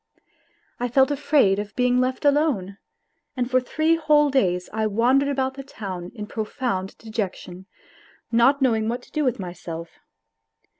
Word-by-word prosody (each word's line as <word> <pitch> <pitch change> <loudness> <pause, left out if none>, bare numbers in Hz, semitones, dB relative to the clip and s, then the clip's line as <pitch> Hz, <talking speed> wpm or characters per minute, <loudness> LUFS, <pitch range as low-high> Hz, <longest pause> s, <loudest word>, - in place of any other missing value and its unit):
I 245 - 0
felt 265 +3 +3
afraid 275 -9 +3
of 205 -1 -6
being 250 0 +2
left 255 +2 -2
alone, 280 - +1 0.6
and 245 -1 0
for 255 0 +4
three 315 +6 +1
whole 300 -2 +3
days 180 -9 +1
I 220 0 0
wandered 250 +7 +2
about 265 -1 -1
the 275 0 -8
town 190 -9 -7
in 210 -2 -5
profound 215 -3 -3
dejection, 190 -4 -5 0.6
not 260 +4 +4
know 255 -3 +4
ing 220 0 -1
what 245 +1 -3
to - - -19
do 305 - -1
with 255 -4 +1
myself. 175 -3 -7
245 Hz, 155 wpm, -23 LUFS, 195-275 Hz, 0.6 s, for